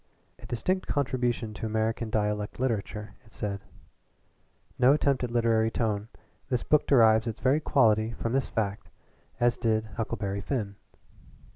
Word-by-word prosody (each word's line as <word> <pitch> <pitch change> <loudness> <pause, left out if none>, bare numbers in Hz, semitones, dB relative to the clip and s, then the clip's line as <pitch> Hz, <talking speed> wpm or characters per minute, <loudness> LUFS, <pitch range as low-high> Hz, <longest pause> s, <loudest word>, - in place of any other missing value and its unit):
"A - - -11
distinct 185 +10 -1
contribution 125 -5 -1
to 110 - -4
American 110 +1 -1
dialect 105 0 -1
literature," 110 -4 -2
it 110 - -22
said. 100 -2 -4 1.2
"No 130 +2 +6
attempt 140 -3 +1
at 125 - -1
literary 115 -1 +2
tone; 110 -2 -1 0.4
the 125 - +2
book 150 -1 +3
derives 110 -4 +5
its 115 0 -4
very 135 +3 +3
quality 110 -7 +3
from 115 +1 -3
this 135 -1 +1
fact, 100 -2 -3 0.5
as 120 0 +2
did 110 -2 +1
'Huckleberry 100 -3 -2
Finn.'" 105 -3 -2
115 Hz, 140 wpm, -28 LUFS, 110-125 Hz, 1.2 s, No